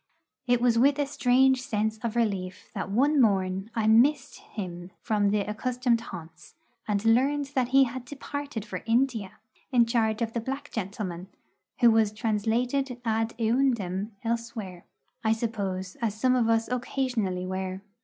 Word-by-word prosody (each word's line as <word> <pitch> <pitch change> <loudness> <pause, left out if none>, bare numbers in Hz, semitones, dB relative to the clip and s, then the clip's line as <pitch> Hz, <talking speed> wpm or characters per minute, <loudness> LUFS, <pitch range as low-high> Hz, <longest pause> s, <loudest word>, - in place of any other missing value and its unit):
It 245 -1 +3
was 240 -2 +3
with 275 +3 +4
a 290 - +1
strange 265 -1 +3
sense 220 -2 -1
of 235 0 -3
relief 195 -6 -2
that - - -4
one 275 +7 +3
morn 195 -2 +1
I 225 -2 0
missed 260 +6 +3
him 175 -3 -7
from 205 -2 +1
the 210 0 +1
accustomed 240 +3 0
haunts, 165 -7 -10 0.3
and 205 0 -1
learned 270 +5 +2
that 255 -3 +1
he 270 +2 +5
had 255 0 -4
departed 285 -4 -6
for 190 -4 -6
India 230 -4 +1 0.4
in 240 -3 +5
charge 225 -1 +1
of 225 0 -3
the 235 - -1
black 270 +4 -5
gentleman, 190 -4 -4 0.5
who 235 -1 +7
was 220 -2 +3
translated 235 +5 -1
ad 225 0 0
eundem 225 -4 0
elsewhere, 230 -6 -4 0.4
I 220 0 +3
suppose, 200 -5 -3
as 215 -2 -2
some 255 +2 +3
of 235 -2 +2
us 225 0 +2
occasionally 245 -7 -2
were. 185 0 -4
225 Hz, 155 wpm, -27 LUFS, 205-250 Hz, 0.5 s, who